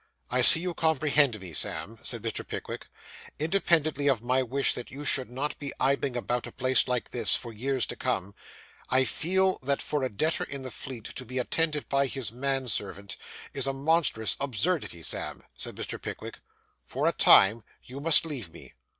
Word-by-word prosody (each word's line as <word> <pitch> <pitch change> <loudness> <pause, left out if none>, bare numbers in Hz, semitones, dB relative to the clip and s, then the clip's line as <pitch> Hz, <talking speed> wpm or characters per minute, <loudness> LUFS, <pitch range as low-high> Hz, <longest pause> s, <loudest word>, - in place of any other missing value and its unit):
'I 125 +1 +2
see 140 - +10
you 180 0 -3
comprehend 150 -7 +2
me, 90 -4 -9
Sam,' 105 +9 -1
said - - -5
Mr. - - -5
Pickwick. - - -7 0.5
'Independently 155 -3 +1
of 120 -5 0
my 130 +2 +1
wish 135 +2 +1
that 125 - -7
you 145 +2 -8
should 130 -4 +1
not 135 +4 -4
be 140 -1 -5
idling 135 -1 0
about 120 0 -3
a - - -9
place 130 -1 +3
like 125 -1 -2
this, 120 - +3
for 120 -2 -5
years 130 +2 -1
to - - -6
come, 100 +3 -3 0.6
I 130 +1 +4
feel 190 +6 +1
that 140 +1 -1
for 150 - -2
a 130 - -1
debtor 155 +10 -1
in 140 -1 -7
the 130 - -6
Fleet 125 -4 -7
to 130 - -5
be 125 +1 -6
attended 150 +4 0
by 140 0 +1
his 130 -4 -3
manservant 120 -6 -3 0.4
is 135 -1 +1
a 135 - -1
monstrous 140 -5 +1
absurdity. 135 - -1
Sam,' - - -1
said - - -6
Mr. - - -5
Pickwick, - - -8 0.4
'for - - -2
a - - +4
time 105 +3 +5 0.2
you 135 +3 -9
must 160 +1 +7
leave 130 - -6
me. 85 - -13
130 Hz, 185 wpm, -27 LUFS, 120-145 Hz, 0.6 s, see